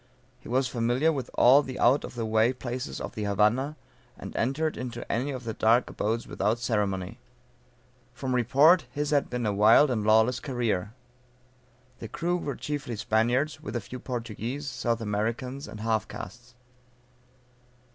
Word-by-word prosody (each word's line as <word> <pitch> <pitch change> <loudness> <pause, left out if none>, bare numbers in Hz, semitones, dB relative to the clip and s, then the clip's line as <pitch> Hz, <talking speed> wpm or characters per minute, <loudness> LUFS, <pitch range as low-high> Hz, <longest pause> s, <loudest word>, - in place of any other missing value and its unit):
He - - -12
was 130 +2 +1
familiar 125 +6 +1
with 135 -5 -4
all 135 +4 +7
the 130 -3 -7
out 130 +4 +4
of - - -8
the 115 -2 -2
way 110 +3 +3
places 125 0 -5
of - - -6
the 105 - -4
Havana, 105 +9 +1 0.4
and - - -9
entered 145 +7 0
into 120 -2 -6
any 125 +5 -1
of 130 -3 -5
the 115 -1 -4
dark 115 +4 +2
abodes 115 +2 -2
without 110 +3 0
ceremony. 105 -2 -2 0.9
From 130 -2 -4
report 135 +6 +4
his 145 +3 -3
had 145 -2 +2
been 125 -1 -3
a 105 - +1
wild 110 +8 +6
and 110 -4 -1
lawless 110 +3 +4
career. 115 -6 -2 1.0
The 115 - -6
crew 175 +10 -1
were 140 -6 -4
chiefly 145 -5 -4
Spaniards, 120 +8 0
with 105 - -6
a - - +1
few 125 +6 -8
Portuguese, 120 +3 -5
South 120 -3 -1
Americans, 115 +6 -3
and 105 - -9
half 110 -1 0
castes. 120 +6 -10
120 Hz, 160 wpm, -27 LUFS, 110-130 Hz, 1.0 s, all